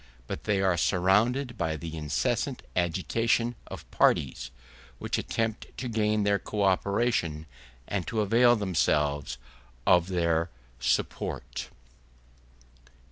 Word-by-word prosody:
But 70 - -6
they 100 -2 +1
are 95 -2 +2
surrounded 110 - +2
by 80 -1 -1
the 80 0 -6
incessant 75 -4 -1
agitation 115 +7 +1
of - - -8
parties, 65 -2 +2 0.5
which - - -2
attempt 115 0 -2
to 130 - -4
gain 110 -2 +1
their 100 0 +2
co 105 -2 -2
operation 95 -5 +1 0.4
and 95 -4 -2
to 110 -2 0
avail 120 +4 +5
themselves 75 - 0 0.5
of 90 -1 +5
their 85 -2 +1 0.3
support. 60 -1 -2
95 Hz, 110 wpm, -28 LUFS, 80-110 Hz, 0.5 s, avail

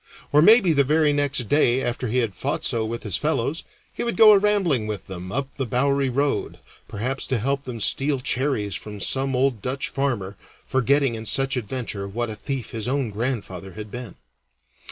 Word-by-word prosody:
Or, 150 - +5
maybe 205 -1 +6
the 140 -2 +4
very 150 +1 +2
next 140 -5 0
day 130 -2 +3
after 120 +1 -2
he 120 +3 -1
had 105 - -9
fought - - -3
so 115 -1 +1
with 115 +1 -4
his 100 -4 -2
fellows, 150 0 -1 0.3
he - - -5
would 235 - -2
go 220 -1 +9
a 205 - +6
rambling 190 - +1
with 105 -3 -5
them 90 0 -7
up 140 +3 -3
the 135 - -1
Bowerie 140 +2 +1
Road, 140 +3 -1 0.3
perhaps 125 +6 -3
to 130 - 0
help 135 +5 -1
them 125 -3 -6
steal 135 +5 +2
cherries 125 -6 0
from 105 +1 -6
some 135 +5 0
old 125 -4 +1
Dutch 130 +4 -2
farmer, 115 -8 -2 0.3
forgetting 135 0 +2
in 110 0 -6
such 135 +4 +1
adventure 115 -4 -4
what 115 +3 -3
a - - -4
thief 130 +4 -5
his 115 0 -5
own 130 -3 -1
grandfather 100 -5 -4
had 105 -1 -8
been. 125 -2 -7
130 Hz, 195 wpm, -23 LUFS, 110-140 Hz, 0.3 s, go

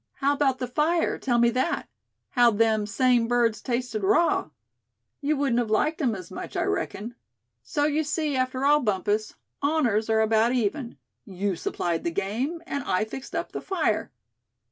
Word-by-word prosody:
"How 280 0 +1
about 275 -2 +1
the 255 - -2
fire, 305 +7 +1
tell 245 -3 +1
me 235 0 +4
that? 260 +8 -1 0.4
How'd 240 -4 +4
them 220 -2 +2
same 240 +2 +2
birds 235 -3 +1
tasted 245 -3 -2
raw? 320 - +2 0.7
You 300 +1 +1
wouldn't 270 -4 +1
have 235 -3 -1
liked 310 +10 +1
'em 240 -6 +1
as 185 -3 -9
much, - - -6
I - - +1
reckon. 205 - -3 0.5
So, 295 -3 -2
you 300 +1 +2
see, 295 -1 -1
after 255 +1 0
all, 295 +1 +5
Bumpus, 210 -2 -1 0.3
honors 250 -8 +1
are 220 0 +3
about 220 +2 +3
even; 235 - -1 0.3
you 195 0 -2
supplied 170 0 -2
the - - 0
game, 230 - -2
and 280 -5 -3
I 185 +4 +1
fixed 260 +4 -8
up - - -3
the - - -5
fire. 325 - -1
245 Hz, 170 wpm, -26 LUFS, 215-285 Hz, 0.7 s, all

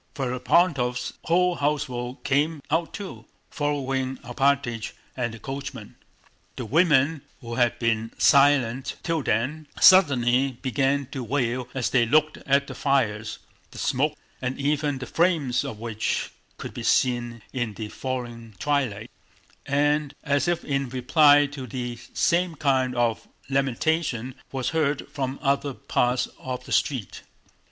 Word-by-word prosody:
Ferapóntov's 125 0 +1
whole 180 +1 +2
household 130 -3 -2
came 145 +3 +1
out 165 +1 +1
too, 200 -3 -8 0.3
following 135 -3 -1
Alpátych 120 -2 0 0.2
and 120 -2 -2
the 115 - -9
coachman. 135 -2 -7 0.6
The 125 - -5
women, 150 - +3 0.2
who 115 -1 -7
had 120 -1 +2
been 115 -1 0
silent 135 -2 +4
till 165 -2 0
then, 140 +7 -1
suddenly 130 -7 +5
began 135 +1 +1
to 130 -3 -4
wail 125 0 -1
as 130 -3 -1
they 120 -3 +3
looked 155 +4 +3
at 140 +1 +3
the 135 - -8
fires—the 115 -6 -2
smoke - - 0 0.2
and 130 +1 -2
even 145 0 0
the 130 - -6
flames 160 -8 +1
of 110 - -6
which 110 -1 -2 0.3
could - - -7
be - - -6
seen 120 -3 +1
in 120 -5 -2
the 110 0 -5
failing 120 -4 -5
twilight—and 145 +3 -2
as 145 +1 +1
if 175 -1 0
in 140 -2 -1
reply 145 +3 +5
the 125 -4 -6 0.2
same 175 -1 +2
kind 130 -3 +1
of 120 -2 0 0.2
lamentation 135 -1 0 0.2
was 130 -2 -2
heard 150 -3 0
from 135 -1 -3
other 140 -1 0
parts 125 +1 0
of 125 0 -5
the - - -10
street. 125 - -1
135 Hz, 130 wpm, -25 LUFS, 120-145 Hz, 0.6 s, suddenly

